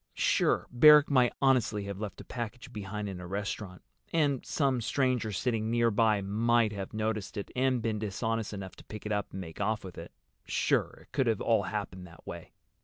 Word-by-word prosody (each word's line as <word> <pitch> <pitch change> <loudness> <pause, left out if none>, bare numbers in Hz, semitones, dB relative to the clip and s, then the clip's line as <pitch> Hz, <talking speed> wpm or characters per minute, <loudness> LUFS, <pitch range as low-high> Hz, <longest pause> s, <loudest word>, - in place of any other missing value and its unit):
Sure, - - +2
Barrack 150 +4 +7
might 125 -3 +4
honestly 125 -6 +3
have 100 -1 -6
left 105 -2 -5
a - - -13
package 125 +1 -6
behind 105 0 -4
in 95 -2 -6
a 90 - -7
restaurant. 100 -1 -4 0.3
And 145 -5 +1
some 135 -5 0
stranger 125 -2 0
sitting 110 +1 -1
near 115 0 +3
by 110 -1 +3
might 115 +2 +2
have 100 -2 -5
noticed 110 -2 -2
it, 100 - -5
and 130 -2 +1
been 110 -2 -1
dishonest 110 +1 -2
enough 95 -2 -7
to - - -13
pick 110 0 -9
it 105 - -3
up 105 -1 -1
and 95 - -5
make 80 +1 -8
off 105 +2 0
with 95 -2 -8
it. - - -9 0.3
Sure, - - 0
it - - -28
could 125 -6 +1
all 115 - +3
have - - -5
happened 95 -4 -4
that 85 - -16
way. - - -8
110 Hz, 200 wpm, -30 LUFS, 100-125 Hz, 0.3 s, Barrack